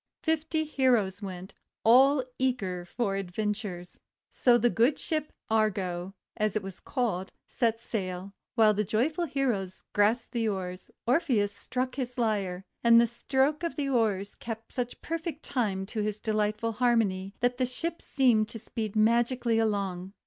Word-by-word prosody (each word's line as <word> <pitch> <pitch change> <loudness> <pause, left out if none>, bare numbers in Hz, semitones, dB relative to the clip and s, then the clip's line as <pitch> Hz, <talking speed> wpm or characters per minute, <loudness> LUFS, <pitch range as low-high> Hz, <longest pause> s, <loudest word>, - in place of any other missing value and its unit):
Fifty 320 0 0
heroes 245 -10 +2
went, 185 -1 -7 0.3
all 265 +4 +6 0.2
eager 195 -9 -1
for 200 +1 -1
adventures. 195 -1 -4 0.3
So 245 -2 +4
the 240 0 +3
good 240 +6 +3
Ship 310 -2 -2 0.2
Argo, 195 -4 0 0.2
as 215 -2 0
it 215 - 0
was 195 -2 -7
called, 215 -8 -2 0.2
set 230 -2 0
sail. 190 -4 -4 0.2
While 220 -2 +6
the 210 +1 0
joyful 270 - 0
heroes 245 - -2
grasped 220 +4 +2
the 230 -2 0
oars, 185 -2 -4 0.2
Orpheus 240 - +2
struck 255 +3 -3
his 250 -2 -4
lyre, 200 -5 -1 0.2
and 230 0 +8
the 235 - +6
stroke 265 +6 0
of 335 -1 -2
the 285 -3 -1
oars 210 -6 +1
kept 225 -1 -7
such 245 -1 -4
perfect 330 -1 -4
time 200 -7 -1
to 215 +2 -3
his 210 0 -2
delightful 215 +1 0
harmony, 210 -5 +1
that 245 0 +1
the 255 - +2
ship 330 +7 -4
seemed 230 -6 +3
to 230 - -6
speed 220 -1 -5
magically 235 +1 +3
along. 195 -4 -1
225 Hz, 150 wpm, -29 LUFS, 200-250 Hz, 0.3 s, and